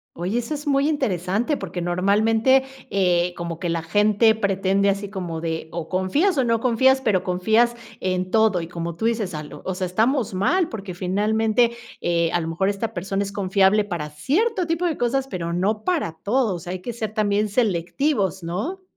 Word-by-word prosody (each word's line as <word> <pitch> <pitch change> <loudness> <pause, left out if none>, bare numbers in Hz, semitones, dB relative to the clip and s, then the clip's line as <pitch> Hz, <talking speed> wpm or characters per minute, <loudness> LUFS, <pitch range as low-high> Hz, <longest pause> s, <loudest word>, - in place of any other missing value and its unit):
Oye, 190 +8 -1
eso 240 +6 -6
es 295 +1 -5
muy 280 +1 +2
interesante, 220 - 0
porque 180 -2 -5
normalmente, 220 +9 +3 0.3
eh, 180 -2 +2
como 170 -1 -5
que 175 -1 -2
la 165 0 -1
gente 210 +5 +3
pretende 200 -1 +1
así 200 +1 -3
como 175 -5 -5
de 160 -1 -3
o 165 -1 -5
confías 280 - +1
o 265 - +2
no 230 -1 +1
confías, 260 +2 +3
pero 210 -8 +1
confías 220 +7 +2 0.3
en 185 0 -1
todo, 220 -5 +3
y 165 - -6
como 170 -1 -5
tú 220 +7 -2
dices, 220 -5 -1
a 150 -1 -4
lo 150 - -11
o 190 - -2
sea, 185 0 -2
estamos 225 +3 +1
mal 335 - +2
porque 195 - -6
finalmente, 215 +5 +1 0.3
eh, 170 -1 +1
a 175 - +1
lo 160 - -4
mejor 180 +4 0
esta 210 +3 -2
persona 195 +1 -2
es 200 0 -5
confiable 200 +1 +3
para 170 -6 -4
cierto 365 - 0
tipo 330 +2 -1
de 330 -4 0
cosas, 265 +3 0
pero 170 -7 -3
no 210 +5 0
para 320 - 0
todo, 220 -3 +1
o - - -6
sea, 175 +1 -7
hay 185 - -5
que 240 - -4
ser 220 -2 -5
también 210 -1 +1
selectivos, 200 - 0
¿no? 210 - -4
200 Hz, 195 wpm, -23 LUFS, 180-235 Hz, 0.3 s, normalmente